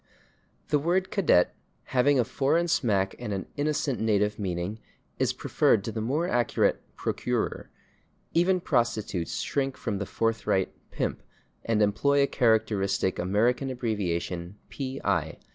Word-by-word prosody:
The 150 - +3
word 180 +5 0
/cadet/, 165 - +4 0.4
having 135 +2 +4
a - - +5
foreign 160 +8 +1
smack 100 - +1
and 105 - -4
an 95 -1 -3
innocent 145 -3 0
native 105 -1 +1
meaning, 95 +2 -3 0.4
is - - +2
preferred 100 - +2
to 115 - -3
the 110 - -3
more 145 +10 0
accurate 120 -5 +1 0.2
/procurer/; - - -2 0.7
even 180 +2 +3
prostitutes 110 - -1
shrink 135 -2 -1
from 105 -5 -3
the 100 - -3
forthright 115 -4 0 0.2
/pimp/, - - -2 0.5
and 110 -2 +2
employ 140 +8 +3
a - - +5
characteristic 110 -7 +1
American 115 +9 +1
abbreviation, 95 -6 -2
/P. 135 -1 -4
I. - - 0
115 Hz, 130 wpm, -27 LUFS, 100-140 Hz, 0.7 s, a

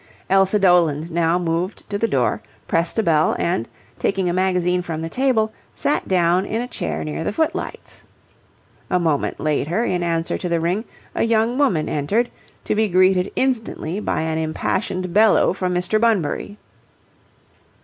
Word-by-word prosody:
Elsa 195 +1 +4
Doland 170 -4 +3
now 170 +1 +2
moved 175 +2 -2
to - - -1
the 230 +3 +1
door, 125 - 0 0.3
pressed 165 +4 0
a 225 - +2
bell, 160 -4 +3
and, 170 -9 -1 0.3
taking 195 -2 0
a 175 - 0
magazine 180 -1 +1
from 160 -2 -5
the 165 - -4
table, 230 -2 +1 0.2
sat 290 - -1
down 180 0 +3
in 220 +3 -2
a 245 - -3
chair 80 - -4
near 75 -1 -4
the - - -1
footlights. 325 - -3 0.9
A 180 - +2
moment 160 -5 0
later, 155 +7 0
in 180 -6 0
answer 165 -1 -1
to 180 - -3
the 170 -1 +1
ring, 180 +7 -1 0.3
a - - -2
young 225 +1 +2
woman 185 - +2
entered, 200 +12 0 0.3
to - - -1
be 215 +1 +2
greeted 185 0 +3
instantly 225 -8 -1
by 215 - -1
an 160 0 -1
impassioned 175 +3 -2
bellow 215 -3 +4
from 185 -1 -2
Mr. 180 +5 0
Bunbury. 205 -2 0
180 Hz, 160 wpm, -21 LUFS, 165-215 Hz, 0.9 s, Elsa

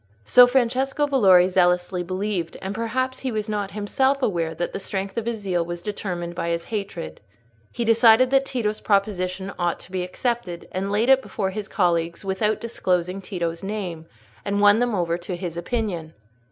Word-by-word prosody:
So 245 - +8
Francesco 265 +3 +1
Valori 195 -11 +5
zealously 180 0 +2
believed; 185 -1 -3
and 190 +1 -4
perhaps 255 +4 -2
he 260 - -3
was 215 -1 -2
not 205 -2 -2
himself 265 +7 0
aware 165 -6 0
that 175 - -3
the - - -3
strength 195 0 -4
of 230 -1 -3
his 235 -1 -1
zeal 180 -4 0
was 175 0 -6
determined 180 -4 -4
by 170 -1 -3
his 170 0 -1
hatred. 195 - -5 0.5
He 235 - -3
decided 230 +2 +5
that 270 0 +4
Tito's 215 -4 -2
proposition 195 -2 0
ought 175 -1 0
to - - -14
be 185 -1 -2
accepted, 180 -1 -3
laid 200 +5 0
it 265 0 +6
before 195 -6 -3
his 210 +1 -5
colleagues 170 -1 0
without 210 +3 0
disclosing 185 -5 -1
Tito's 170 -3 -4
name, 190 -5 -5 0.4
and 200 0 -1
won 205 +1 +6
them 240 -2 +1
over 170 -2 0
to 180 +1 -5
his 175 -2 -5
opinion. 175 -4 -3
195 Hz, 175 wpm, -23 LUFS, 175-225 Hz, 0.5 s, So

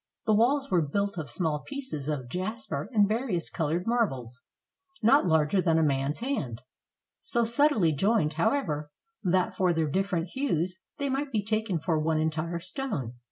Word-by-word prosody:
The 215 - +3
walls 270 +6 +2
were 180 -2 +4
built 200 +5 -1
of 150 - -5
small 160 -5 0
pieces 260 - -5
of 135 -5 -2
jasper 210 - -4
and 210 -4 +4
various 215 -6 -1
colored 165 +3 -1
marbles, 135 - -1 0.6
not 235 -1 +5
larger 160 +3 +3
than 165 -3 +2
a 160 - +3
man's 140 +3 0
hand; 150 - -2 0.6
so 235 - 0
subtilely 235 - +3
joined, 190 0 +2
however, 155 - 0 0.3
that, 185 +1 +2
but 195 - -16
for 185 -2 +2
their 160 -1 +1
different 180 +1 -1
hues, 185 - -1 0.2
they 280 - -1
might 275 +1 -2
be 215 -4 0
taken 215 -3 0
for 160 0 0
one 160 +1 +1
entire 160 +2 -1
stone. 170 - -4
180 Hz, 165 wpm, -28 LUFS, 155-225 Hz, 0.6 s, not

